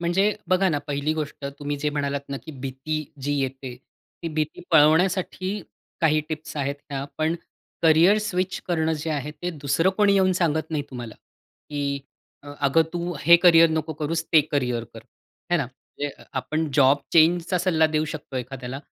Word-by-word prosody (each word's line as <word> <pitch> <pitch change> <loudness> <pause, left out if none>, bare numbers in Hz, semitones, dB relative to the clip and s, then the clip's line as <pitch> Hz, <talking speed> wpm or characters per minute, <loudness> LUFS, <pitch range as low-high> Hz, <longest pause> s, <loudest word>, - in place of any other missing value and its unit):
म्हणजे 175 +3 +2 0.2
बघा 185 +1 +3
ना, 150 -3 0
पहिली 145 +2 -1
गोष्ट 155 -2 -5
तुम्ही 145 0 -3
जे 150 +1 -1
म्हणालात 140 -1 -2
ना, 140 - -3
की 155 - -10
भीती 135 +4 -4 0.2
जी 145 +2 -1
येते 130 -1 -4 0.5
ती 165 - -2
भीती 155 0 -2
पळवण्यासाठी 180 +5 +3 0.4
काही 155 -1 +3
टिप्स 155 -1 -6
आहेत 140 0 -1 0.2
ह्या. 135 -1 -3
पण 160 +2 +1 0.5
करियर 170 +6 +6
स्विच 185 -3 -2
करणं 160 -2 +1
जे 160 +1 -3
आहे 150 -1 -2
ते 180 - -1
दुसरं 165 +6 +2
कोणी 205 -1 +4
येऊन 190 -1 +4
सांगत 160 -3 0
नाही 155 -2 -1
तुम्हाला. 120 -3 -7 0.6
की 140 -1 -2 0.4
अ, 145 - -12 0.2
अगं 160 +4 +4
तू 175 0 -3
हे 170 +2 +8
करियर 165 -2 +7
नको 160 0 -1
करूस 155 +2 -2
ते 155 - +8
करियर 125 -5 0
कर. 115 - -9 0.5
हे 175 - +4
ना? 145 - +1
म्हणजे 130 +3 -7
अ, - - -17
आपण 155 +4 -2
जॉब 140 0 +5
चेंजचा 170 +2 +4
सल्ला 165 -3 +3
देऊ 155 0 0
शकतो 145 -3 -7
एखाद्याला. 130 +1 -5
155 Hz, 175 wpm, -24 LUFS, 140-170 Hz, 0.6 s, हे